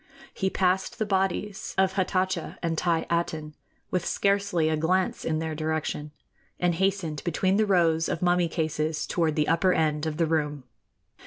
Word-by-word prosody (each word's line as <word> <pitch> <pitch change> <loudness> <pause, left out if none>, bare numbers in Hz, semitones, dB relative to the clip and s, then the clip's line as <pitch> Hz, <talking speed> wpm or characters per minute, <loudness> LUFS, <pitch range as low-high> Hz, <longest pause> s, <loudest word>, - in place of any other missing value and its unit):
He 190 - 0
passed 190 +2 0
the 220 - 0
bodies 195 0 -1
of 190 0 +3
Hatatcha 185 -1 -1
and 165 -1 0
Thi 165 -1 +1
Aten, 160 -3 -1 0.4
with 180 -2 0
scarcely 200 -5 +1
a 160 - +2
glance 180 +4 0
in 155 - 0
their 160 0 -2
direction, 155 -1 -2 0.5
and 175 -1 +2
hastened 180 -5 -1
between 185 +3 +1
the 215 0 +2
rows 165 -4 +3
of - - -1
mummy 175 -1 +3
cases 155 -1 -1
toward 160 -3 0
the 150 -1 +1
upper 170 +4 +3
end 155 -1 +1
of 155 -1 -3
the 165 - +2
room. 150 -3 -1
170 Hz, 165 wpm, -27 LUFS, 155-190 Hz, 0.5 s, of